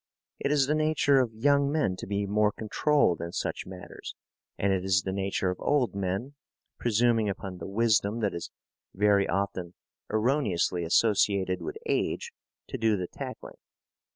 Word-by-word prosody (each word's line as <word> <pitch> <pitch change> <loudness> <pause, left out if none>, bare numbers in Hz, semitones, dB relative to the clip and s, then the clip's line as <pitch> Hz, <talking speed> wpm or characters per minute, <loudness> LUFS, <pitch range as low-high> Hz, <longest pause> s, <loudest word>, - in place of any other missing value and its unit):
It 140 - -1
is 145 -2 +4
the 145 - +1
nature 155 -3 +3
of 125 -3 +1
young 140 +4 +3
men 145 -12 +1
to - - -7
be 100 0 -1
more 105 +1 +2
controlled 110 - +1
in 85 +1 -5
such - - -3
matters, 95 -1 -9 0.4
and 100 0 +1
it 95 -1 -1
is 95 -1 +2
the 95 - -3
nature 95 -1 -1
of 90 - -6
old 135 -8 +1
men, 100 +7 -3 0.5
presuming 115 -1 +2
upon 95 -2 -6
the - - -6
wisdom 105 +1 +1
that 105 -2 0
is 85 - -5 0.5
very 100 0 +3
often 95 -2 -2 0.4
erroneously 110 - +1
associated 95 0 +2
with 415 - -5
age, 470 0 -1 0.3
to 130 - -6
do 110 -2 +2
the 90 - -2
tackling. - - -8
105 Hz, 160 wpm, -28 LUFS, 95-125 Hz, 0.5 s, is